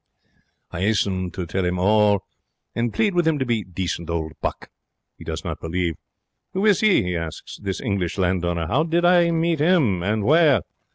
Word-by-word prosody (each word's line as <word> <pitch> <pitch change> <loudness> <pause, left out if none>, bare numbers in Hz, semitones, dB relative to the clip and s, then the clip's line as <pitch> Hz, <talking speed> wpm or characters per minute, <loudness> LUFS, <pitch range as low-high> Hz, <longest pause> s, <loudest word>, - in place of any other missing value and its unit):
I 85 - -5
'asten 95 -3 0
to 90 - -4
tell 95 +3 -2
him 90 0 -1
all, 105 +1 +3 0.5
and 115 0 -1
plead 210 - +1
with 175 -2 +1
him 160 -2 +2
to 130 - -1
be 115 -3 0
decent 85 -2 -4
old 80 -2 -2
buck. - - -4 0.4
He - - -13
does - - -5
not - - -5
believe. 85 +1 -1 0.6
Who 190 +3 0
is 205 -4 +4
he? 215 - +4
he 90 0 -2
asks. 80 -2 -6
This 95 -2 -3
English 100 -4 -2
landowner? 85 -2 0
How 135 - +1
did 170 +2 +1
I 175 -1 +5
meet 165 -1 0
him? 145 - +2
And 105 +3 -1
where? 150 - +4
100 Hz, 185 wpm, -22 LUFS, -, 0.6 s, I